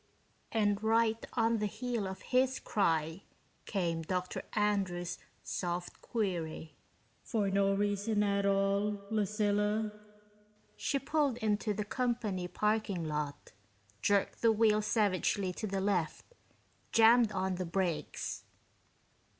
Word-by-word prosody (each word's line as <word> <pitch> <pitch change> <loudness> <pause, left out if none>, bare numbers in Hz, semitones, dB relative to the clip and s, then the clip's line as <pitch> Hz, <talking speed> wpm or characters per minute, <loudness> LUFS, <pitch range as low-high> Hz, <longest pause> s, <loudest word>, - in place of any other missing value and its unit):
And 205 -2 +1
right 225 0 +2
on 230 -1 +2
the 210 - 0
heel 230 0 -3
of 190 0 -7
his 260 +1 +2
cry 165 -3 0 0.5
came 170 -4 -1
Dr. 180 +2 -2
Andrews' 195 -5 0 0.2
soft 175 0 -4
query, 170 -7 -3 0.5
"For 205 -4 -1
no 195 0 +3
reason 205 +1 +1
at 200 -1 +1
all, 200 +1 +1
Lucilla?" 210 0 +1 0.8
She 280 - 0
pulled 280 -2 0
into 215 -1 0
the 210 +1 -2
company 220 -6 -1
parking 210 -2 0
lot, 150 -1 -4 0.5
jerked 200 -1 +1
the 230 - +5
wheel 215 -1 +4
savagely 200 -3 +1
to 215 - -4
the 195 -1 -2
left, 185 -5 0 0.7
jammed 230 0 +6
on 190 -1 -1
the 185 - -2
brakes. 175 -2 -2
205 Hz, 115 wpm, -32 LUFS, 185-220 Hz, 0.8 s, jammed